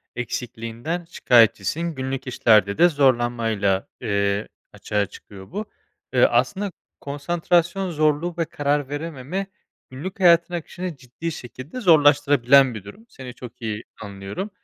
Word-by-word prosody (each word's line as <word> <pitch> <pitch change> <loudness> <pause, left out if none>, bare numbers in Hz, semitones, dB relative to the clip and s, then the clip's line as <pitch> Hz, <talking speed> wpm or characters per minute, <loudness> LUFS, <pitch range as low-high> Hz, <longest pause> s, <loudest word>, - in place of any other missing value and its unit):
eksikliğinden 125 +6 -4
şikâyetçisin. 125 - +2
Günlük 130 0 -4
işlerde 105 -5 +3
de 175 +1 +6
zorlanmayla, 120 - +1
eee, 100 -2 0 0.3
açığa 105 -1 -1
çıkıyor 95 -1 -13
bu. 210 +4 -4 0.5
Eee, - - +5
aslında 200 -1 +1 0.3
konsantrasyon 170 +5 0
zorluğu 155 +2 +1
ve 165 - 0
karar 145 -2 -1
verememe 155 +5 -4 0.4
günlük 185 +10 -7
hayatın 170 -1 +5
akışını 175 0 -5
ciddi 135 +6 -6
şekilde 130 - -8
zorlaştırabilen 145 - +5
bir 105 - -7
durum. 210 - -13
Seni 125 -2 -10
çok 125 0 -11
iyi 110 -1 -4 0.2
anlıyorum. 100 - -6
140 Hz, 120 wpm, -23 LUFS, 115-170 Hz, 0.5 s, de